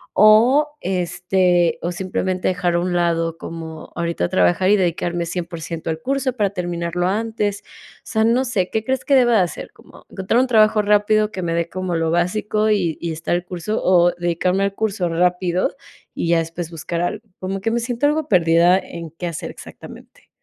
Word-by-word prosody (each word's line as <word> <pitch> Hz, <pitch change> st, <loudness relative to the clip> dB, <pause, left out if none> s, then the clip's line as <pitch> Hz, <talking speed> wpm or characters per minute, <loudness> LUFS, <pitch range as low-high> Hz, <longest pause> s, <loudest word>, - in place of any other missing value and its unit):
o, 230 Hz, +8 st, +6 dB
este, 180 Hz, -1 st, +1 dB
o 175 Hz, -, -2 dB
simplemente 185 Hz, 0 st, -2 dB
dejar 180 Hz, -1 st, 0 dB
a -, -, +2 dB
un 180 Hz, +1 st, -1 dB
lado 165 Hz, -1 st, 0 dB
como 160 Hz, -1 st, -8 dB
ahorita 170 Hz, -, -1 dB
trabajar 90 Hz, -, +2 dB
y 210 Hz, -, +6 dB
dedicarme 175 Hz, -1 st, -1 dB
100% 170 Hz, -1 st, -5 dB
al 160 Hz, 0 st, -3 dB
curso 270 Hz, -1 st, -1 dB
para 205 Hz, -5 st, 0 dB
terminarlo 175 Hz, -1 st, -2 dB
antes. 210 Hz, 0 st, -2 dB
O -, -, -19 dB
sea, 220 Hz, -2 st, 0 dB
no 240 Hz, +4 st, +2 dB
sé, 205 Hz, -8 st, -1 dB
¿qué 220 Hz, -, -2 dB
crees 260 Hz, +2 st, -2 dB
que 280 Hz, -, +3 dB
deba 245 Hz, -2 st, +4 dB
de -, -, +4 dB
hacer? 180 Hz, -2 st, -3 dB
¿Como -, -, -18 dB
encontrar 190 Hz, +5 st, 0 dB
un 255 Hz, -, +3 dB
trabajo 215 Hz, -2 st, +4 dB
rápido 210 Hz, +1 st, +2 dB
que 190 Hz, -, -5 dB
me 170 Hz, -1 st, -1 dB
dé 170 Hz, 0 st, 0 dB
como 185 Hz, 0 st, -3 dB
lo 165 Hz, -1 st, 0 dB
básico 210 Hz, +5 st, 0 dB
y 180 Hz, -7 st, +1 dB
y 170 Hz, -, -2 dB
estar 160 Hz, +2 st, -3 dB
el 175 Hz, -, -2 dB
curso, 180 Hz, +4 st, -4 dB
o 175 Hz, -1 st, +4 dB
dedicarme 175 Hz, +2 st, 0 dB
al 200 Hz, -, -3 dB
curso 200 Hz, -5 st, -1 dB
rápido 180 Hz, -, 0 dB, 0.4 s
y -, -, -3 dB
ya 170 Hz, 0 st, +3 dB
después 165 Hz, +1 st, -5 dB
buscar 170 Hz, +1 st, -4 dB
algo? 210 Hz, +5 st, -3 dB
Como 195 Hz, +1 st, -3 dB
que 225 Hz, +4 st, -1 dB
me 235 Hz, -, 0 dB
siento 240 Hz, +3 st, -2 dB
algo 300 Hz, +1 st, +1 dB
perdida 170 Hz, -1 st, +4 dB
en 170 Hz, -3 st, -7 dB
qué 165 Hz, +3 st, -8 dB
hacer 170 Hz, -3 st, -4 dB
exactamente. -, -, -13 dB
180 Hz, 190 wpm, -20 LUFS, 170-215 Hz, 0.4 s, o